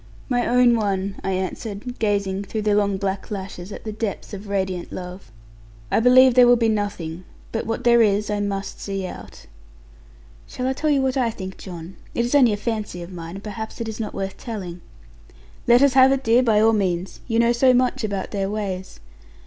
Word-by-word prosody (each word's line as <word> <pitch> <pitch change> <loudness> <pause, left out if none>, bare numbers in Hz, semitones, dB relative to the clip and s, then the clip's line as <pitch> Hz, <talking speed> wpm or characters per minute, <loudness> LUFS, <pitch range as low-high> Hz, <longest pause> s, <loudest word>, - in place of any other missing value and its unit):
'My 245 -2 +1
own 245 0 +5
one,' 200 -3 -1
I 190 - -1
answered, 205 +5 -4
gazing 200 -2 0
through 215 +2 -4
the 210 -1 +2
long 200 -1 +2
black 195 +1 -3
lashes, 190 -2 -6
at - - -8
the 215 - -4
depths 215 -1 -4
of 200 +1 -7
radiant 190 -3 -2
love; 180 - -8 0.6
'I - - +3
believe 255 +2 +6
there 250 0 +7
will 245 - +7
be 230 -1 +2
nothing: 185 -5 -3 0.3
but 225 - -3
what 225 - -2
there 235 -1 +5
is 210 -1 +2
I 205 - -1
must 200 -1 -3
see 195 -1 -3
out.' 180 - -10 1.0
'Shall 250 - -5
I 260 - +1
tell 305 +4 -1
you 280 -2 +3
what 265 0 0
I 245 -3 +2
think, 190 -4 -7
John? 175 -1 -9 0.2
It 235 - +1
is 240 - -3
only 260 -5 +6
a - - -2
fancy 210 -5 -4
of 175 +2 -10
mine, 170 0 -7
and 195 - -9
perhaps 220 +2 -6
it 230 - -3
is 220 0 -6
not 220 - -4
worth 195 0 -4
telling.' 185 -7 -6 0.9
'Let 240 +2 +6
us 280 -2 +4
have 265 0 +7
it, 270 0 0
dear, 230 +1 +4
by 225 -4 +3
all 225 +1 +5
means. 185 -3 -1
You 225 -2 0
know 235 0 +4
so 255 +2 +4
much 255 0 +1
about 200 -3 -3
their 195 -2 -1
ways.' 195 -3 -4
210 Hz, 210 wpm, -22 LUFS, 190-235 Hz, 1.0 s, there